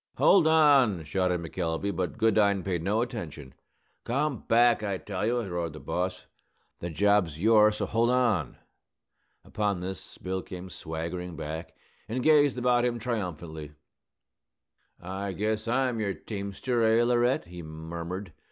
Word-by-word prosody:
"Hold 185 -5 +5
on!" 140 - +5
shouted 90 +2 0
McElvey; 85 +3 -2
but 90 0 -2
Goodine 100 -3 +3
paid 90 -4 -2
no 105 +6 +1
attention. 80 - -7 0.5
"Come 140 0 -1
back, 120 0 +4
I 100 -3 -2
tell 100 +1 -3
you!" 120 +1 +1
roared 85 -5 -3
the 75 - -9
boss. 90 +1 -3 0.5
"The 85 - -4
job's 100 -2 +2
yours, 105 +2 +5
so - - -1
hold 115 +2 +1
on!" 115 - +1 0.9
Upon 100 -3 -1
this 90 -1 -7
Bill 95 0 -3
came 90 0 -9
swaggering 85 +2 -5
back, 80 +1 -6 0.3
and 125 +3 -2
gazed 145 -4 +4
about 125 -1 +2
him 120 -1 0
triumphantly. 85 -10 -5 1.3
"I 95 +2 -5
guess 110 +3 -2
I'm 125 -1 +1
your 100 -3 -1
teamster, 105 +4 -3
eh, 115 +1 +4
Laurette?" 120 +1 +2
he 90 0 -9
murmured. 85 +3 -6
100 Hz, 140 wpm, -28 LUFS, 85-115 Hz, 1.3 s, Hold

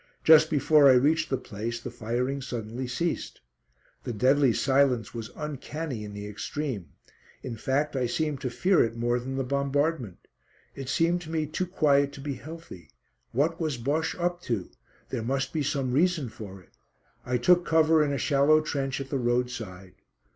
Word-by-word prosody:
Just 160 0 +7
before 150 -1 +5
I - - +8
reached 155 +5 +3
the 135 - 0
place 115 +1 -5
the 120 +1 -7
firing 125 +4 -2
suddenly 120 0 -5
ceased. 165 +7 -3 0.6
The - - -4
deadly 130 +4 +3
silence 130 -3 +2
was 115 -2 -6
uncanny 150 -4 -5
in 105 -1 -8
the 105 0 -6
extreme; 105 - -5 0.5
in 125 -3 -5
fact 140 +5 -1
I 125 -2 +1
seemed 150 +1 -2
to 130 - -2
fear 185 +9 +3
it 115 0 -2
more 120 +1 0
than 130 +2 -5
the 135 - -1
bombardment. 140 - -1 0.5
It 135 -2 -7
seemed 170 +5 +2
to 160 - -10
me 160 -1 -1
too 165 +5 -3
quiet 140 -5 +2
to - - -10
be 140 +1 -4
healthy. 135 - -10 0.4
What 160 +7 0
was 155 -5 -1
Bosche 145 +7 -1
up 175 0 -1
to? 105 -7 -2 0.4
There 125 - -3
must 135 +3 -2
be 155 - 0
some 140 -2 -1
reason 155 -1 +2
for 105 -4 -9
it. - - -28 0.5
I 125 0 0
took 175 +8 +4
cover 160 -1 +4
in 145 - 0
a 140 - -1
shallow 145 +2 +4
trench 140 -3 -2
at 135 -1 -7
the 135 - 0
roadside. 120 -7 -2
135 Hz, 175 wpm, -27 LUFS, 120-155 Hz, 0.6 s, I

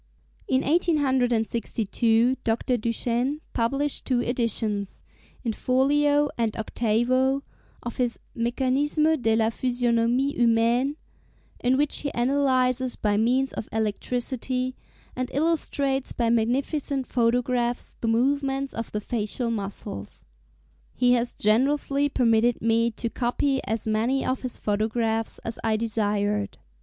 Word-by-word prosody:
In 260 +1 +2
1862 245 - +1
Dr. 230 +2 0
Duchenne 240 +4 -1
published 275 +5 0
two 255 -2 +1
editions, 225 -4 -1 0.4
in 230 -3 -1
folio 290 +4 +2
and 225 -2 0
octavo, 245 +5 +1 0.4
of 240 - -6
his 245 -2 0 0.2
'Mécanisme 270 +6 +1
de 225 -1 +2
la 225 0 +2
Physionomie 245 +2 +1
Humaine,' 235 +4 +2 0.6
in 255 +2 +2
which 295 +1 +2
he 285 - -2
analyses 255 -1 +1
by 205 -1 0
means 250 +5 +1
of - - -6
electricity, 250 +4 -2 0.4
and 255 0 -3
illustrates 280 -4 0
by 235 -1 +1
magnificent 265 +4 0
photographs, 245 0 0
the 230 - -1
movements 270 +3 +1
of 230 0 -5
the 210 - -2
facial 230 +2 -2
muscles. 195 - -5 0.7
He 245 0 +3
has 240 0 0
generously 275 +6 +2
permitted 235 -2 +2
me 230 +1 +2
to 230 +1 -4
copy 265 +3 0
as 225 0 -2
many 225 +5 0
of 255 - -1
his 255 -2 -3
photographs 220 +2 -1
as 225 - -2
I 220 -1 +1
desired. 210 -2 -1
245 Hz, 115 wpm, -25 LUFS, 225-265 Hz, 0.7 s, He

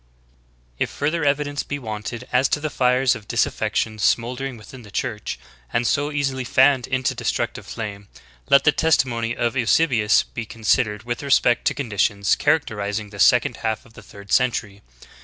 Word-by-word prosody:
"* - - -36
11. - - +3
If - - -4
further 155 +3 -1
evidence 145 0 0
be 145 - -5
wanted 110 -1 -6
as 130 +1 +3
to - - 0
the 155 0 -3
fires 125 0 +2
of 105 - -9
dis - - +2
affection 110 -1 -2
smoldering 125 +4 0
within 125 +4 -12
the 105 - -14
Church, 110 -2 -3 0.3
and 120 - 0
so 145 +5 +1
easily 135 -3 -1
fanned 130 +1 +3
into 130 -1 0
destructive - - -3
flame, 105 -3 -6 0.4
let 140 -1 +6
the 150 - +5
testimony 125 -7 +1
of 120 +1 -1
Eusebius 120 -3 +3
be 115 - -7
con 115 +1 -12
sidered 105 -2 +1
with 120 0 -3
respect 135 -3 +2
to - - +1
conditions 105 -6 +1
characterizing 105 -8 -1
the 100 - -11
second - - +4
half 110 -1 -3
of 115 - -19
the - - -13
third 100 -1 -14
century. 110 -5 +1
120 Hz, 175 wpm, -22 LUFS, 105-135 Hz, 0.4 s, let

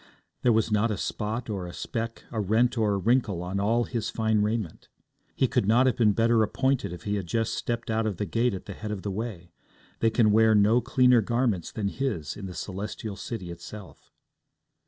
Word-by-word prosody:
There 125 - +4
was 110 0 +2
not 105 +2 +2
a 105 - -2
spot 110 +3 -3
or 95 -5 -4
a 85 - -8
speck, 115 0 -4
a 110 - -3
rent 110 +5 +2
or 110 -3 +2
a - - +1
wrinkle 105 -4 +1
on 95 +2 -3
all 115 +4 +2
his 115 -2 -3
fine 110 -1 +1
raiment. 105 -4 -2 0.5
He - - +2
could - - 0
not 120 +4 +5
have 130 - +3
been 110 -4 +3
better 115 +1 +3
appointed 130 +1 0
if 90 - -8
he 105 0 -1
had 95 -3 -4
just 115 +6 0
stepped 120 -1 -3
out 110 0 +1
of 100 -5 -3
the 105 - -2
gate 115 +3 0
at 95 - -8
the - - -7
head 110 - -7
of 105 -3 -4
the 100 - -2
way; 95 -5 -5 0.5
they 115 - +3
can 110 -1 +3
wear 110 +1 +5
no 105 +4 +4
cleaner 125 -1 +4
garments 115 -5 0
than 105 -3 -2
his 100 - -3
in 100 -2 -7
the 90 - -8
Celestial 100 +4 -5
City 100 -4 -6
itself. 95 +4 -11
110 Hz, 215 wpm, -27 LUFS, 100-115 Hz, 0.5 s, not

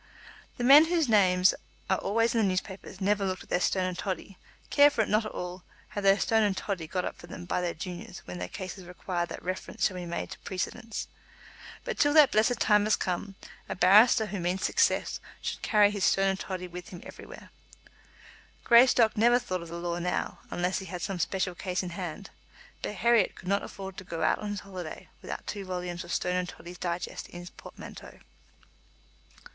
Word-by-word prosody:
The 245 - -3
men 285 +5 +9
whose 330 -3 +1
names 185 -4 +5 0.3
are 190 - +1
always 230 +3 +1
in 230 - +2
the 205 - +3
newspapers 190 0 -4
never 205 +1 +1
look 185 -1 -2
at - - -20
their - - +1
Stone 185 +1 +1
and 185 -1 -2
Toddy, 190 0 -5 0.3
care 285 0 +7
for 250 -6 0
it 215 - -1
not 215 +1 +2
at - - -7
all, 180 0 -6 0.3
have 205 - -5
their 195 0 +6
Stone 225 0 +3
and 205 -3 +1
Toddy 185 -6 -3
got 180 +2 -2
up - - -5
for 175 - -12
them 175 - -8
by 180 - -1
their 175 -1 -2
juniors 180 +4 -7
when 90 0 -7
cases 185 0 -7
require 175 0 -3
that - - -8
reference 185 +1 -2
shall 185 - 0
be 175 -1 -5
made 170 - -4
to - - -8
precedents. 220 +4 -4 0.8
But - - -4
till 290 +1 +3
that 300 -3 +8
blessed 225 +2 +2
time 210 -1 +4
has 215 - +4
come, 190 +2 -3 0.3
a - - -2
barrister 210 +6 +6
who 205 -2 -5
means 180 +3 -1
success 460 - +1 0.2
should - - -4
carry 210 -2 +4
his 205 -2 -3
Stone 195 0 +3
and 190 0 -1
Toddy 185 -1 -5
with 180 0 -9
him 175 - -9
everywhere. - - -11 1.1
Greystock 235 -2 +6
never 235 +3 +5
thought 185 -7 -3
of 170 - -9
the 170 - -6
law 170 0 -3
now, 180 +1 -2
unless 180 +1 -1
he 190 - -8
had 180 -2 -6
some 195 -3 -3
special 185 +2 -1
case 180 +1 -3
in 180 - -5
hand; 180 +2 -6 0.5
but 210 - -4
Herriot 235 0 +3
could 185 - -12
not 200 +1 +2
afford 190 -1 -8
to - - -7
go 165 -3 -4
out 155 - +2
on 210 - -4
his 205 -1 -4
holiday 185 -5 -8
without - - -6
two 200 -1 -5
volumes 180 -1 -4
of 175 - -9
Stone 180 0 0
and 180 -1 -2
Toddy's 175 +1 -11
Digest 175 0 -4
in - - -10
his 175 - -10
portmanteau. - - -11
190 Hz, 205 wpm, -28 LUFS, 180-210 Hz, 1.1 s, men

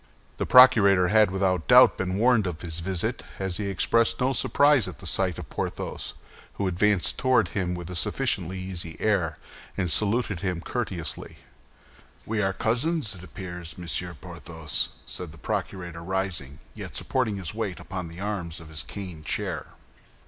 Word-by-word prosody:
The - - -2
procurator 100 -8 +7
had 110 0 +5
without 95 -3 0
doubt - - +8
been 95 0 -2
warned 115 -2 +4
of 85 -2 -5
his 85 -1 -5
visit, 90 0 -2 0.2
as 95 -2 -2
he 105 - -3
expressed 110 +4 +2
no 130 +2 +2
surprise 145 -3 +3
at 90 -6 -7
the - - -11
sight 95 -4 +2
of - - -7
Porthos, - - -4 0.4
who 100 - -2
advanced 95 0 +1
toward 125 -8 +3
him 90 0 -2
with 90 -1 -7
a 90 - -6
sufficiently 85 +2 -1
easy 90 -3 -6
air, 90 -8 +1 0.4
and 90 -3 0
saluted 105 -1 +1
him 90 -1 -2
courteously. 95 -4 -3 0.9
"We 110 -1 -1
are 95 -1 +1
cousins, 120 - 0
it 95 -2 -10
appears, 90 -3 -7
Monsieur 90 0 0
Porthos?" 80 -1 -2 0.2
said 90 -3 -5
the 80 - -13
procurator, 85 0 -4
rising, 90 -6 -2 0.2
yet - - -8
supporting 125 -6 0
his 95 -3 -3
weight 105 -4 -3
upon 90 -2 -5
the 85 +2 -10
arms 95 -5 -3
of 85 -2 -12
his 80 -1 -3
cane 90 -6 -8
chair. - - -2
95 Hz, 165 wpm, -26 LUFS, 85-105 Hz, 0.9 s, doubt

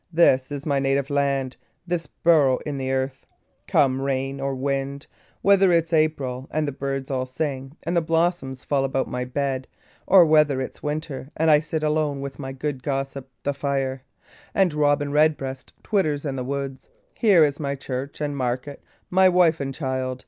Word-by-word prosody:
This 140 -6 +4
is 145 -1 -5
my 140 -3 +1
native 135 +1 0
land, 140 -2 0 0.3
this 170 -3 -2
burrow 150 -6 +3
in 145 -3 -3
the 130 0 -2
earth! 130 0 -2 0.4
Come 135 -7 +3
rain 135 0 -2
or 135 0 -1
wind 140 +1 -2
and - - -33 0.4
whether 195 -1 +5
it's 165 0 +2
April, 140 -5 0
and 155 0 -1
the - - -1
birds 135 0 -4
all 130 -1 -1
sing, 135 +1 -4
and 170 - -2
the 170 - +4
blossoms 165 -5 0
fall 140 -2 +1
about 135 0 -1
my 125 0 -3
bed 130 0 -2 0.4
or 185 -2 +8
whether 150 -3 +4
it's 130 - -6
winter, 150 -2 -4
and 160 0 +4
I 150 - +7
sit 155 +1 -3
alone 150 -2 0
with 140 +1 -6
my 135 -2 -5
good 135 0 -4
gossip 135 0 -3
the 145 - 0
fire, 135 -1 -2 0.5
and 190 -5 +3
robin 145 -1 +2
red 150 +1 +4
breast 135 -1 -7
twitters 155 -9 0
in 140 -2 -2
the 130 - -3
woods 135 0 -5 0.3
here, 200 -8 +6
is 145 -1 +1
my 140 -2 -2
church 135 +1 -5
and 145 -1 -2
market, 130 +2 -2
and - - -37
my 190 +1 +6
wife 175 -3 +4
and 135 -1 -3
child. 130 -2 -3
140 Hz, 185 wpm, -24 LUFS, 135-155 Hz, 0.5 s, or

